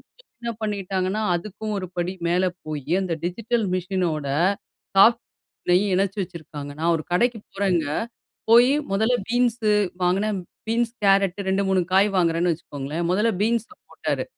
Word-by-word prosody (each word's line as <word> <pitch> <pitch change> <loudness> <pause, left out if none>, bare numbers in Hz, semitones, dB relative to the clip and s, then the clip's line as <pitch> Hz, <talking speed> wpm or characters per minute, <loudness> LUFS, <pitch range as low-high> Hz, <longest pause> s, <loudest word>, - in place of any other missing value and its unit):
இப்ப - - -29 0.3
என்ன 235 0 -3
பண்ணிட்டாங்கன்னா, 195 -1 -1
அதுக்கும் 210 +4 -4
ஒரு 185 - -4
படி 175 +2 -1
மேல 180 +2 +2 0.2
போய் 150 +1 -4
அந்த 180 -3 -2
டிஜிட்டல் 225 +4 -1
மிசின் 185 0 -1
ஓட 145 -2 -4 0.7
சாஃப்ட் 235 +4 +6 0.4
பில்லயும் 185 +2 +3
இணைச்சு 195 +2 0
வச்சிருக்காங்க. 155 -5 -8
நான் 170 +1 +3
ஒரு 155 - -5
கடைக்கு 235 +5 +2
போறேங்க, 185 -5 +1 0.6
போய் 240 +3 +7 0.2
முதல்ல 220 +5 +2
பீன்ஸ் 240 0 +1 0.4
வாங்குனேன். 195 +3 +1 0.3
பீன்ஸ், 230 +1 +1
கேரட், 195 -1 +3
2, 195 +1 +2
3 190 -1 +3
காய் 195 +2 +5
வாங்குறேன்னு 170 0 +2
வச்சுக்கோங்ளேன். 150 +1 -5
முதல்ல 215 +4 +2
பீன்ஸ் 230 0 +1 0.2
போட்டாரு - - -2
195 Hz, 140 wpm, -23 LUFS, 175-220 Hz, 0.7 s, போய்